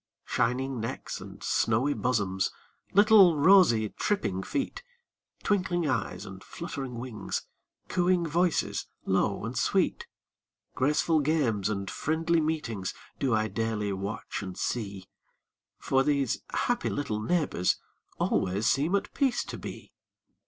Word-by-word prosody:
Shining 130 +2 0
necks 115 +1 -5
and - - -10
snowy 120 +6 +2
bosoms, 100 -8 0 0.4
Little 200 -5 +7
rosy, 145 - +6
tripping 150 - -1
feet, 270 - -3 0.6
Twinkling 180 -5 +1
eyes 105 -8 -2
and 95 0 -10
fluttering 140 -7 -6
wings, 115 -5 -4 0.4
Cooing 180 -1 +2
voices, 170 +2 0 0.2
low - - +1
and - - -5
sweet, - - +1 0.7
Graceful 150 +4 +2
games 135 -10 +1
and 100 -2 -2
friendly 165 - 0
meetings, 120 -12 -2 0.2
Do 130 -5 +2
I 110 0 +1
daily 105 -1 -1
watch 100 +3 -4
and 95 -2 -7
see. 100 -5 -3 0.7
For 135 - +2
these 140 -3 +1
happy 245 0 0
little 110 -7 -2
neighbors 140 - +1 0.4
Always 95 +4 0
seem 150 +11 +2
at 200 - -2
peace 270 -3 +1
to - - -7
be. - - -8
130 Hz, 120 wpm, -28 LUFS, 105-165 Hz, 0.7 s, Little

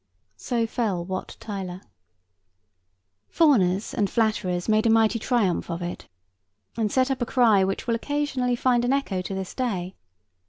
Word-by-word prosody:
So 235 -2 -1
fell 210 -7 -2
Wat 185 0 -5
Tyler. 190 -4 -6 1.5
Fawners 205 - +3
and 205 -5 0
flatterers 210 -6 0
made 215 +1 +3
a - - +3
mighty 225 0 +3
triumph 215 -8 0
of 170 +1 -4
it, 175 - -6 0.7
and 215 -3 -1
set 260 +1 +2
up 265 - -2
a - - +1
cry 225 -7 +4
which 195 +1 -2
will 235 - 0
occasionally 265 0 -1
find 240 0 +2
an 245 +2 +2
echo 220 -10 -1
to 190 +1 -5
this 190 -1 -5
day. 190 -8 -2
220 Hz, 155 wpm, -25 LUFS, 190-245 Hz, 1.5 s, cry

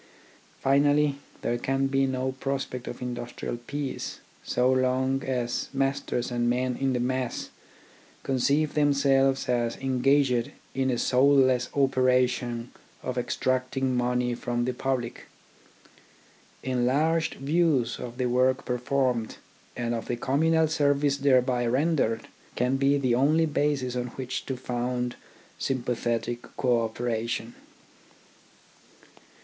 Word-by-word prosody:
Finally, 145 +1 +3 0.2
there 120 0 0
can 135 +2 0
be 135 0 +2
no 130 0 -1
prospect 135 -2 -3
of 120 +1 -6
industrial 120 -1 -5
peace 140 -2 -4 0.2
so 125 +1 +2
long 130 +1 +1
as 125 -2 -2
masters 135 -2 -1
and 120 -1 +1
men 125 +1 0
in 135 0 0
the 125 - 0
mass 125 0 -2 0.7
conceive 140 +3 +1
themselves 140 -2 +3
as 120 -2 0
engaged 130 -1 +2 0.2
in 130 0 0
a 125 - +1
soulless 130 -1 +3
operation 125 -3 +1 0.3
of 130 - -3
extracting 130 +1 -1
money 125 0 +1
from 120 0 -2
the 125 - -1
public. 125 -2 -3 1.4
Enlarged 140 +6 +1
views 140 -4 +1
of 120 0 -7
the 130 - 0
work 130 +2 +2
performed, 125 -2 0 0.4
and 120 -1 -1
of 115 - -4
the 120 - -2
communal 160 +6 +2
service 145 -2 +2
thereby 130 -3 +3
rendered, 130 -2 +1 0.3
can 125 +2 +1
be 140 +1 +3
the 130 -3 +1
only 150 +6 +3
basis 145 -4 0
on 125 0 -2
which 130 -1 -4
to 130 - -3
found 125 0 -2 0.4
sympathetic 120 -2 -1 0.2
co 120 -3 +2
operation. 115 0 -3
130 Hz, 115 wpm, -27 LUFS, 125-135 Hz, 1.4 s, Finally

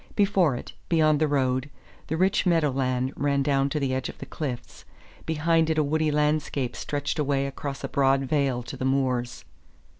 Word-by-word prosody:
Before 195 - +3
it, - - -8 0.2
beyond 155 -3 +3
the 155 - +2
road, 130 -1 0 0.4
the 160 - -2
rich 190 +2 +2
meadow 165 -5 +3
land 130 0 -1
ran 140 -1 +1
down 140 -1 +1
to 150 - -1
the 135 -2 -1
edge 130 0 -2
of - - -10
the - - -8
cliffs; 130 -4 -6 0.4
behind 160 +1 +2
it 160 - 0
a 155 - +4
woody 155 +2 +1
landscape 150 -4 0
stretched 145 +1 -3
away 140 -2 +1
across 140 0 -5
a - - -1
broad 135 0 +2
vale 135 -3 0
to 120 - -7
the - - -5
moors. 130 -2 -1
140 Hz, 185 wpm, -26 LUFS, 130-155 Hz, 0.4 s, a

